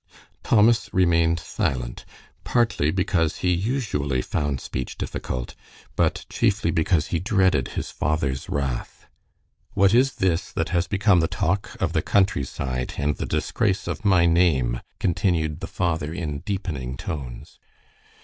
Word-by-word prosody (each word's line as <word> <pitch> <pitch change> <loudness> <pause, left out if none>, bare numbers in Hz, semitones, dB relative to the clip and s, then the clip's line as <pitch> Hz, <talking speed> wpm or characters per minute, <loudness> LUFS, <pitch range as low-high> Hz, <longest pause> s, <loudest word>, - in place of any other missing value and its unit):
Thomas 115 +1 +3
remained 85 -3 +3
silent, - - -3 0.4
partly 115 -11 +1
because 90 -3 +1
he 90 - +4
usually 85 - -1
found 75 -3 -1
speech 65 - -5
difficult, 60 -1 -4 0.4
but - - +1
chiefly - - +1
because 80 -1 +1
he 85 - 0
dreaded 95 - +2
his - - -3
father's 70 -3 -1
wrath. 70 -4 -3 0.7
"What 100 -1 +4
is 130 +2 +4
this 95 0 0
that - - -1
has 90 -1 +1
become 100 -2 +3
the 80 - +2
talk 95 +6 -1
of - - 0
the - - +2
countryside 70 -9 0
and 75 +1 0
the - - -3
disgrace 100 -3 0
of - - -4
my 95 -4 +4
name?" 80 -9 +2 0.2
continued 80 -4 0
the - - -5
father, 80 -3 -1
in 80 -5 -4
deepening 75 -9 -4
tones. 65 -4 -7
85 Hz, 135 wpm, -24 LUFS, 70-95 Hz, 0.7 s, he